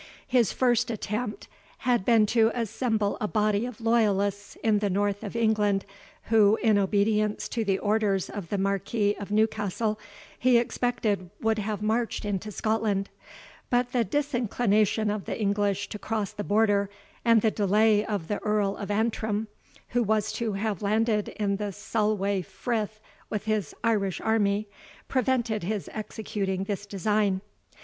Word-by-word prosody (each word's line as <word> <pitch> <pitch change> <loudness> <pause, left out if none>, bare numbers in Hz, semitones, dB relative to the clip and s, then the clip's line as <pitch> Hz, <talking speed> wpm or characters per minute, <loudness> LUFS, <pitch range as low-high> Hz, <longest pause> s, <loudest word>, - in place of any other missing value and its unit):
His 245 -5 +3
first 245 -1 +2
attempt 215 0 -3 0.4
had 245 -5 +3
been 225 -3 +5
to 225 +1 +3
assemble 220 -2 -1
a 210 - +1
body 210 +1 +1
of 250 -2 -9
loyalists 205 -3 +1
in 215 -2 +3
the 205 -1 0
north 205 +2 0
of 205 +1 -6
England, 210 -3 +2 0.4
who, 215 -2 +5
in 220 -2 +3
obedience 210 +2 +1
to 230 - -1
the 195 -2 +1
orders 205 -3 +1
of 195 -5 -7
the 205 - -1
Marquis 200 +2 0
of 205 - -6
Newcastle, 215 0 0 0.4
he 250 -1 +5
expected 235 -5 0
would 220 -1 +1
have 210 0 -3
marched 225 +1 0
into 205 +1 -3
Scotland; 210 -1 0 0.6
but 245 0 +1
the 245 -2 +2
disinclination 220 -4 +1
of 210 -2 -4
the - - -4
English 200 -1 0
to 210 - -6
cross 215 -3 -2
the 205 - -5
Border, 205 -1 +2 0.3
and 230 -2 +4
the 220 - +3
delay 210 +1 +3
of 205 -7 -3
the 205 - -2
Earl 210 -2 0
of 200 - -6
Antrim, 215 0 -1 0.4
who 245 - +1
was 215 -1 +1
to 220 0 -2
have 205 0 -2
landed 215 +1 +1
in 200 -2 -1
the 205 0 -3
Solway 200 -1 0
Frith 215 - -3 0.3
with 210 -2 -3
his 215 -2 -1
Irish 205 -5 +1
army, 210 -1 +1 0.4
prevented 245 -4 0
his 205 +3 -3
executing 200 -3 -3
this 205 0 -4
design. 200 -1 +1
210 Hz, 150 wpm, -27 LUFS, 200-225 Hz, 0.6 s, been